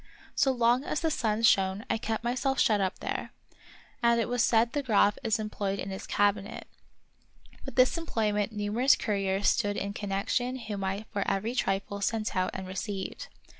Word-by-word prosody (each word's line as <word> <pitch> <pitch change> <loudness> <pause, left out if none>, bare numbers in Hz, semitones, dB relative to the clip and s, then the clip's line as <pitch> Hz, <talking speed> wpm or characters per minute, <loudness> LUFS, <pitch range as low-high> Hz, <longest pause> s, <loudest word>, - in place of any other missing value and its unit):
So 270 - +3
long 245 +1 +2
as 300 - -2
the 325 -1 +1
sun 225 -5 0
shone 195 -1 +3
I - - 0
kept 225 0 -3
my 240 +1 0
self 265 +1 -1
shut 210 -3 +3
up 190 0 -1
there, - - -4 0.7
and 235 -1 +4
it 230 - 0
was 245 0 +1
said 230 +1 +3
the 290 - 0
Graf 210 -5 +3
is 225 -3 +1
employed 205 -2 -3
in 195 - -5
his 190 - -7
cabinet. 205 -1 0 1.0
With - - -7
this 255 0 +4
employment 210 -9 -1
numerous 220 +6 +2
couriers 195 -1 0
stood 205 0 0
in 200 0 -3
connection 205 +6 -1
whom 215 -5 -5
I 195 +3 -2
for 205 - -2
every 195 +4 -1
trifle 200 -3 -1
sent 215 +1 -1
out 185 0 +1
and 190 - -5
received. 190 +1 -5
210 Hz, 180 wpm, -29 LUFS, 200-235 Hz, 1.0 s, and